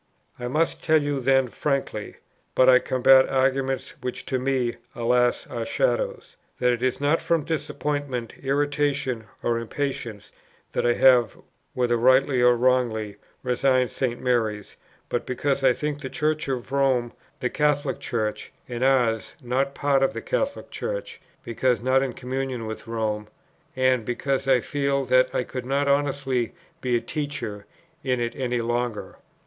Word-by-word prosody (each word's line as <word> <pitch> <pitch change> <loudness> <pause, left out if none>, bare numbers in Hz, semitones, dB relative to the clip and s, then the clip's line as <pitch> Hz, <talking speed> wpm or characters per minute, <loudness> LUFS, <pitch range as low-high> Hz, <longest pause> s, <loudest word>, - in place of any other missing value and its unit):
"I 125 - -3
must 155 +6 0
tell 155 -1 +4
you 145 -1 -1
then 135 0 +3
frankly, 140 -5 -2 0.4
(but 130 - +5
I 125 -1 +8
combat 130 +1 +5
arguments 135 0 0
which 125 0 -4
to 130 - -1
me, 130 -2 0 0.2
alas, 120 +1 +2
are 115 - -4
shadows,) - - -1 0.2
that 125 0 +2
it 120 -1 -2
is 130 -1 0
not 145 +3 +2
from 165 -3 +1
disappointment, 145 -5 -3
irritation, 140 -3 0 0.2
or 115 0 +1
impatience, 115 -3 -4 0.4
that - - 0
I 120 - +4
have, 125 -4 +4 0.4
whether 120 -1 +2
rightly 130 +2 +4
or 125 0 +6
wrongly, 120 -4 +1 0.3
resigned 130 -1 +2
St. 120 -3 -2
Mary's; 110 -5 -1 0.3
but 120 - -2
because 135 +2 -1
I 130 - +6
think 150 +3 -3
the 135 - -5
Church 155 +1 -1
of 130 -1 -3
Rome 130 -4 +1 0.3
the 125 - -1
Catholic 145 -2 +1
Church, 110 -3 -3 0.2
and 120 0 -3
ours 125 -5 +2
not 135 +3 -1
part 140 -2 +2
of 135 - +2
the 115 - -5
Catholic 275 +1 -2
Church, - - -5 0.2
because 120 +1 +1
not 130 +1 +3
in 135 -2 -2
communion 130 -1 -4
with 110 +1 -7
Rome; 110 -2 -2 0.5
and 130 -2 +2
because 135 +3 -2
I 130 -2 +4
feel 140 0 -1
that 130 +1 +4
I - - +1
could 125 0 -6
not 140 +1 +1
honestly 140 -4 0 0.3
be 125 -1 +1
a 120 - +1
teacher 140 -9 -5 0.4
in 130 -2 0
it 120 0 -2
any 125 -2 -1
longer. 120 -1 -2
130 Hz, 155 wpm, -25 LUFS, 120-140 Hz, 0.5 s, I